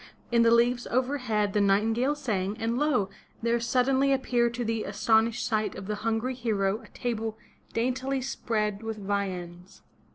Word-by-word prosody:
In 235 0 +4
the 230 - +5
leaves 240 +1 +3
overhead 245 -5 0
the 210 - +3
nightingale 225 +8 +2
sang, 210 -7 -2
and 230 +1 -1
lo! 255 -10 +1 0.3
there 235 0 +2
suddenly 260 +3 +2
appeared 245 -3 +2
to 240 0 -2
the 225 -1 -1
aston 220 +3 +3
ished 230 - -5
sight 215 -2 0
of 190 - -7
the 210 - -2
hungry 225 +3 0
hero 215 -4 0
a - - -15
table 225 -3 -3 0.3
daintly 255 +3 -1
spread 215 -5 -2
with 225 -1 -4
viands. 190 -3 -4
225 Hz, 160 wpm, -28 LUFS, 210-250 Hz, 0.3 s, the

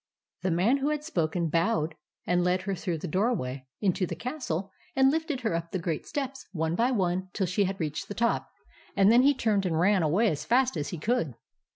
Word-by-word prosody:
The 185 - 0
man 185 +11 +3
who 280 +2 0
had 300 -1 -1
spoken 170 - 0
bowed 165 -1 +1 0.3
and 175 0 +2
led 180 +1 +1
her 195 0 -2
through 175 -2 -2
the 170 - -5
doorway 150 - -1
into 185 -2 +1
the 170 - -4
castle, 200 - -4 0.2
and 265 0 +5
lifted 315 -4 -2
her 225 -7 0
up 165 0 -2
the 190 - -2
great 170 -3 -3
steps, 270 -2 -4
one 160 -1 -1
by 235 +8 +2
one, 185 -5 0
till 195 - 0
she 185 +3 +1
had 190 +1 -3
reached 155 -3 -3
the 205 - -6
top; 235 0 0 0.5
and 195 +2 +6
then 240 +2 +7
he 280 +2 +4
turned 215 -5 +1
and 160 -2 0
ran 190 +2 +4
away 180 +9 +3
as 150 - -3
fast 255 0 +2
as 150 -2 -2
he 175 - -5
could. 160 - 0
190 Hz, 220 wpm, -28 LUFS, 165-240 Hz, 0.5 s, then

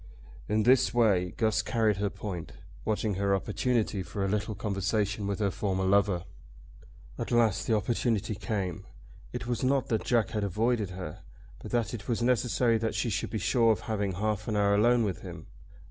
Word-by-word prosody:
In 105 +1 +2
this 125 -1 +4
way 95 -7 +3
Guss 110 -1 +2
carried 110 -2 +1
her 100 0 0
point, 95 -4 -6 0.3
watching 110 -1 0
her 100 +1 +1
opportunity 110 0 0
for 100 +1 -3
a - - 0
little 105 +2 -1
conversation 105 0 -1
with 100 -1 -1
her 100 -2 0
former 95 -2 -1
lover. 95 -2 +2 0.9
At - - -3
last 115 -2 +2
the 115 - +3
opportunity 110 -1 0
came. 95 -4 -3 0.5
It - - -5
was 120 0 -2
not 135 0 +1
that 110 -2 0
Jack 115 -3 +1
had 105 -2 -1
avoided 110 +2 0
her, 90 -4 -7 0.4
but - - -8
that 120 -1 0
it 105 -4 -7
was 120 -1 0
necessary 120 -1 +2
that 110 -1 -2
she 110 +2 0
should - - -2
be 110 - -3
sure 115 +3 +3
of 105 - 0
having 100 -3 -2
half 105 +2 -2
an 110 - -1
hour 100 -1 +3
alone 120 +3 +4
with 95 -6 -2
him. - - -9
105 Hz, 185 wpm, -29 LUFS, 100-115 Hz, 0.9 s, this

